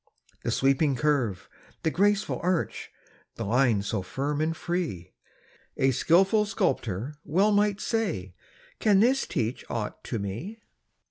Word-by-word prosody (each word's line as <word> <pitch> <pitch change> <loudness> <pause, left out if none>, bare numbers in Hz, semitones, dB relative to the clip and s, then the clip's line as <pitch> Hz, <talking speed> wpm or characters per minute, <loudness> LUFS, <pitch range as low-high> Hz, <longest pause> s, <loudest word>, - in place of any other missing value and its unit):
The - - -3
sweeping 135 +1 +2
curve, 125 -9 0 0.4
the 160 - +1
graceful 205 +3 +1
arch, 180 -1 -1 0.5
The - - -4
line 115 -2 +2
so 105 0 -2
firm 140 +10 -2
and 160 +1 -1
free; 160 - -3 0.6
A 135 0 +3
skilful 195 - +3
sculptor 135 - -1
well 195 +6 +2
might 205 0 +2
say: 180 - -2 0.5
"Can 205 -3 +4
this 260 +5 +3
teach 115 +2 -2
aught 110 -3 -4
to 120 - -3
me?" 110 - -5
150 Hz, 130 wpm, -27 LUFS, -, 0.6 s, Can